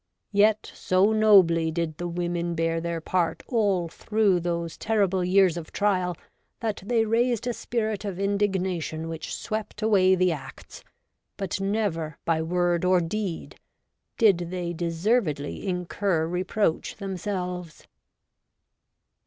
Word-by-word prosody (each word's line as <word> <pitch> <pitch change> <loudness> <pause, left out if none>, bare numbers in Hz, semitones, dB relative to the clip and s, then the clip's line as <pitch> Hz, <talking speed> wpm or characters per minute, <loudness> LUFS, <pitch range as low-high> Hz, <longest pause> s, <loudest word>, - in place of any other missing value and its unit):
Yet 210 +1 +3
so 185 +3 +2
nobly 190 -7 +5
did 160 -1 -3
the 175 - -2
women 175 0 -2
bear 165 0 0
their 170 0 -2
part 170 +1 -1
all 200 -8 +1
through 205 +2 +1
those 170 -1 -3
terrible 195 -4 +1
years 185 -1 +4
of 165 -2 -7
trial, 185 -4 0 0.4
that 220 -2 -3
they 225 +2 +1
raised 235 +1 +1
a 245 - -1
spirit 220 -3 -2
of 195 -3 -4
indignation 190 -5 -1
which 165 -1 -5
swept 215 0 -5
away 190 -4 +4
the 185 -1 +2
Acts, 150 -5 -9 0.5
but 195 0 -3
never, 195 -6 -1
by 165 -1 +1
word 175 +1 0
or 180 0 +4
deed, 180 +1 -4 0.6
did 180 -6 +3
they 175 -1 -3
deservedly 170 - -1
incur 180 -1 0
reproach 180 +1 -1
them 195 -2 -5
selves.' 180 -3 -5
185 Hz, 130 wpm, -26 LUFS, 170-205 Hz, 0.6 s, nobly